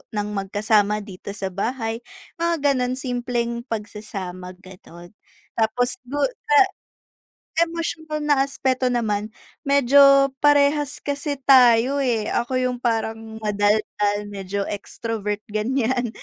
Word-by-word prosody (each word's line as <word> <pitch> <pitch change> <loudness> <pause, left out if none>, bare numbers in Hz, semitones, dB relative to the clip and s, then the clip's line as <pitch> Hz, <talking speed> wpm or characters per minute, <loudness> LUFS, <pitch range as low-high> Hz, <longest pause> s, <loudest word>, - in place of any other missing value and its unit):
ng 210 0 -1
magkasama 205 +1 +1
dito 195 -1 -10
sa 195 -2 -3
bahay, 225 +3 -3 0.4
mga 340 0 +1 0.2
ganon 250 -1 -1
simpleng 245 -2 -3
pagsasama 195 -4 -6
ganon 175 -2 -14 0.5
tapos 245 +3 +1
du 275 +4 -5 0.3
sa 440 - +5 1.1
emosyonal 320 -2 -4
na 290 -2 +3
aspeto 260 -2 0
naman 215 -3 -1 0.4
medyo 275 0 +6
parehas 290 0 +3
kasi 285 0 -3
tayo, 255 0 +5
eh, 230 -5 0
ako 250 +2 -1
yung 250 -1 -1
parang 225 -1 -2
madaldal 205 0 +1
medyo 200 0 -4
extrovert 210 0 -4
ganyan 245 +2 0
235 Hz, 105 wpm, -22 LUFS, 210-270 Hz, 1.1 s, medyo